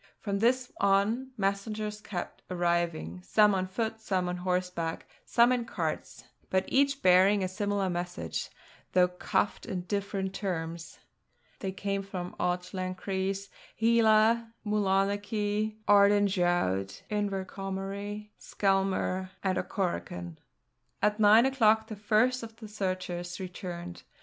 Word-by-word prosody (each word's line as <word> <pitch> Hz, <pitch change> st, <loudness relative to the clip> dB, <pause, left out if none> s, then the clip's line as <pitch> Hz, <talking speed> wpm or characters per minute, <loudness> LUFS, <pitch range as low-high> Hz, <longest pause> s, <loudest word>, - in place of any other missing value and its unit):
From 200 Hz, -2 st, -2 dB
this 250 Hz, +3 st, +2 dB
on, 200 Hz, +6 st, +2 dB
messengers 210 Hz, +1 st, -2 dB
kept 185 Hz, -4 st, -6 dB
arriving, 170 Hz, -, -1 dB
some 210 Hz, -, +4 dB
on 185 Hz, -1 st, 0 dB
foot, 220 Hz, +3 st, -3 dB
some 185 Hz, -4 st, 0 dB
on 180 Hz, 0 st, -2 dB
horseback, 180 Hz, -2 st, -2 dB, 0.2 s
some 235 Hz, +1 st, +4 dB
in 250 Hz, -1 st, +1 dB
carts: -, -, -4 dB, 0.3 s
but 190 Hz, 0 st, +1 dB
each 275 Hz, +1 st, +2 dB
bearing 190 Hz, +2 st, +5 dB
a -, -, +1 dB
similar 200 Hz, 0 st, -1 dB
message, 175 Hz, 0 st, -3 dB, 0.4 s
though 180 Hz, -1 st, +5 dB
couched 180 Hz, +2 st, -1 dB
in 180 Hz, -, -3 dB
different 195 Hz, 0 st, -2 dB
terms. 170 Hz, -4 st, -4 dB, 0.6 s
They 190 Hz, -, -3 dB
came 195 Hz, +1 st, -2 dB
from 185 Hz, -2 st, -6 dB
Auchlenchries, 185 Hz, +2 st, -2 dB, 0.3 s
Heila, 225 Hz, 0 st, +4 dB
Mulonachie, 205 Hz, +1 st, 0 dB
Ardendraught, 185 Hz, -, +3 dB
Inverquohomery, 200 Hz, +1 st, -3 dB
Skelmuir, 190 Hz, -1 st, 0 dB
and 190 Hz, -1 st, +1 dB
Auchorachan. 90 Hz, -, -3 dB, 0.7 s
At 210 Hz, +1 st, +2 dB
nine 215 Hz, +3 st, +7 dB
o'clock 220 Hz, -5 st, +4 dB
the 215 Hz, -, -5 dB
first 220 Hz, +5 st, +2 dB
of 225 Hz, -1 st, -9 dB
the 225 Hz, -1 st, -10 dB
searchers 185 Hz, -3 st, -3 dB
returned. 175 Hz, -1 st, -6 dB
195 Hz, 115 wpm, -29 LUFS, 180-210 Hz, 0.7 s, nine